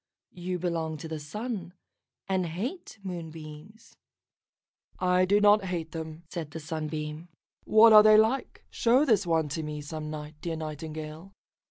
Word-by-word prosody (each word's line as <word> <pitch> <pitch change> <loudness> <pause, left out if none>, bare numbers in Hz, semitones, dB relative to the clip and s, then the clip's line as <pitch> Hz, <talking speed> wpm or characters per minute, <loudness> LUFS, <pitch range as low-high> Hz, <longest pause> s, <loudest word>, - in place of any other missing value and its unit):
You 180 +1 -4
belong 165 -3 -2
to 155 - -7
the 160 -1 -5
Sun, 190 +3 -5 0.5
and 190 -2 0
hate 220 - -5
Moonbeams." 165 +3 -9 1.0
"I 180 0 +3
do 200 +3 +3
not 205 -1 +5
hate 170 -3 -3
them," 160 0 -7
said 160 -2 -5
the 160 - -7
Sunbeam. 155 0 -5 0.4
"What 220 +1 +7
are 215 - +11
they 215 0 +7
like? 225 +5 +1
Show 250 +5 +3
this 210 -8 +2
one 160 -2 +2
to 160 +3 -3
me 150 -1 -5
some 155 +1 -6
night, 150 0 -8
dear 170 -1 -3
Nightingale." 155 +3 -7
165 Hz, 150 wpm, -28 LUFS, 155-200 Hz, 1.0 s, are